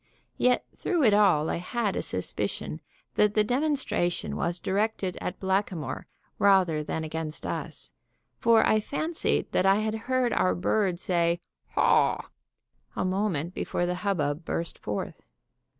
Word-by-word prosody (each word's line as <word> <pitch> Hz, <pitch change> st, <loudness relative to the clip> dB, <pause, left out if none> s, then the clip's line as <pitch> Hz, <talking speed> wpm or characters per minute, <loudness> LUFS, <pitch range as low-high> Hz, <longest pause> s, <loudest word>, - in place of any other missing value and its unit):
Yet 250 Hz, 0 st, +3 dB
through 345 Hz, -5 st, 0 dB
it 220 Hz, -5 st, +5 dB
all 195 Hz, -7 st, +4 dB
I -, -, -1 dB
had 205 Hz, +4 st, -2 dB
a -, -, 0 dB
suspicion -, -, -3 dB, 0.3 s
that 210 Hz, 0 st, +3 dB
the 215 Hz, -, +5 dB
demonstration 260 Hz, -, 0 dB
was 175 Hz, +1 st, -1 dB
directed 195 Hz, -1 st, -1 dB
at 180 Hz, -, -4 dB
Blackamoor 190 Hz, -4 st, -1 dB, 0.3 s
rather 185 Hz, -6 st, +4 dB
than 160 Hz, +1 st, -3 dB
against 160 Hz, 0 st, -5 dB
us; -, -, -5 dB, 0.5 s
for 230 Hz, -1 st, +5 dB
I 215 Hz, -, +4 dB
fancied 315 Hz, +9 st, -1 dB
that 190 Hz, -, +2 dB
I 195 Hz, -, +6 dB
had 215 Hz, +1 st, 0 dB, 0.2 s
heard 255 Hz, -2 st, +2 dB
our 90 Hz, 0 st, +2 dB
bird 180 Hz, -, +1 dB
say 170 Hz, -1 st, +1 dB, 0.4 s
"Haw!" -, -, +3 dB, 0.6 s
a -, -, -1 dB
moment 185 Hz, -4 st, -1 dB
before 175 Hz, -, -1 dB
the 180 Hz, -, 0 dB
hubbub 155 Hz, -6 st, 0 dB
burst 165 Hz, +1 st, -3 dB
forth. 105 Hz, -, -4 dB
190 Hz, 140 wpm, -27 LUFS, 170-215 Hz, 0.6 s, I